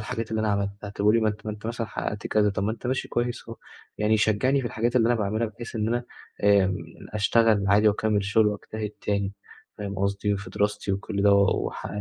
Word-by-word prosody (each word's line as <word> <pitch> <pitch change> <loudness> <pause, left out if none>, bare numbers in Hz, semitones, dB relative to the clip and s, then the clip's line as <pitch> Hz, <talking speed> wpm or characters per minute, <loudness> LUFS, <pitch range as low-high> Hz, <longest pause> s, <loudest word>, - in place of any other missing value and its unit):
الحاجات 110 +1 -4
اللي 110 - 0
أنا 110 - 0
عملتها 100 0 -2
طَب 100 0 -4
قُل 105 - +6
لي 115 - +4
ما 110 - +2
أنت 105 0 -5
ما 105 - -2
أنت 105 +1 -9
مثلًا 115 -1 -3
حقّقت 105 0 -4
كذا، 105 -1 +2
طَب 100 - -3
ما 110 - 0
أنت 120 - -7
ماشي 130 +1 -1
كويس 120 0 -2
أهو. 115 - -7 0.4
يعني 105 +1 +3
يشجّعني 110 +6 +2
في 125 - -3
الحاجات 120 +1 -1
اللي 115 -2 +4
أنا 120 - +3
باعملها 110 +1 0
بحيث 115 +2 -8
إن 110 0 0
أنا 120 +1 -1 0.4
آمم 100 -2 +4 0.4
أشتغل 105 0 +3
عادي 105 +2 +5
وأكمِّل 105 -1 +1
شُغل 105 +2 +3
وأجتهد 105 +1 -3
تاني 100 -1 -1 0.5
فاهم 100 -2 -4
قصدي، 100 +1 0
وفي 100 +1 -6
دراستي 105 -1 -1
وكل 100 +1 -2
ده 100 0 +6
و 100 -1 +3
وح - - -6
105 Hz, 225 wpm, -26 LUFS, 100-115 Hz, 0.5 s, قُل